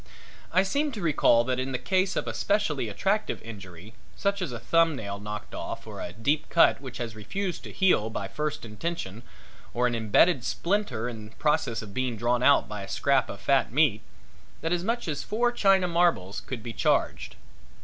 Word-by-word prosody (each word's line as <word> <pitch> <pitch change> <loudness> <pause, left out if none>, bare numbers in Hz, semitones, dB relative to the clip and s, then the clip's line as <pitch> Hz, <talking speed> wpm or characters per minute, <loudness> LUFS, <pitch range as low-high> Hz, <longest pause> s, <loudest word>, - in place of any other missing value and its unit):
I 185 +3 +4
seem 285 +10 0
to 215 - -5
recall 145 -7 +4
that 130 +1 -1
in 130 +1 -2
the - - +1
case 185 +5 0
of - - -2
a - - -2
specially 150 - 0
attractive 195 - 0
injury, 100 -2 -10 0.2
such 200 0 -1
as 175 - -2
a 120 - -4
thumb 165 +7 +3
nail 100 -4 -5
knocked 105 +1 -7
off - - -6
or - - -8
a - - -5
deep 140 - -1
cut 170 - +4
which 130 -3 -7
has 115 -2 -5
refused 180 - -4
to - - -8
heal 180 - +3
by 110 - -4
first 150 -3 -3
intention 115 - -5 0.5
or 125 +1 +2
an 120 - +1
imbedded 115 - +3
splinter 185 - -1
in 110 -3 -7
process 125 -6 0
of 100 -2 -10
being 130 -1 -1
drawn 120 +2 +1
out 140 +2 +5
by 105 -1 -6
a 100 - -7
scrap 140 -1 +2
of - - -7
fat 135 -1 +2
meat, 130 -6 +3 0.6
that 165 +2 0
as 175 0 -1
much 230 +2 -1
as 145 -3 -2
four 240 +3 +1
china 195 -5 +3
marbles 170 - +1
could 120 -5 -5
be 120 -1 -5
charged. - - 0
135 Hz, 195 wpm, -27 LUFS, 110-175 Hz, 0.6 s, out